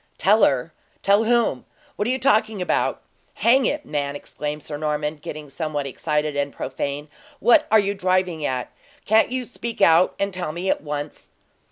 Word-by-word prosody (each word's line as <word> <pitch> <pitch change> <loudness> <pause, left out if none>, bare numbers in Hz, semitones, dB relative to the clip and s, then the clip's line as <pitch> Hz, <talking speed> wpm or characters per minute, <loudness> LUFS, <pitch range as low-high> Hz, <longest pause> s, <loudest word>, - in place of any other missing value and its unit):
"Tell 210 +3 +4
her? 135 +4 +2 0.3
Tell 200 +3 +4
whom? 235 - +2 0.3
What 205 - -1
are - - 0
you 260 - +1
talking 220 -5 +2
about? 180 - 0 0.3
Hang 250 +2 +4
it, 295 0 -2
man!" 145 -1 -2
exclaimed 150 +1 -5
Sir 150 - -6
Norman, 150 0 -2
getting 150 0 -8
somewhat 145 0 -3
excited 150 +2 -2
and 140 0 -1
profane, 140 +3 -4 0.3
"what 235 +2 +5
are 220 - +6
you 200 -1 +2
driving 185 -4 0
at? 130 -3 -2 0.3
Can't 220 +3 +4
you 255 -1 -2
speak 235 -1 -7
out 165 +2 +5
and 200 -1 -1
tell 175 -4 -4
me 180 +3 -1
at - - -1
once?" 145 0 -6
165 Hz, 175 wpm, -23 LUFS, 150-215 Hz, 0.3 s, are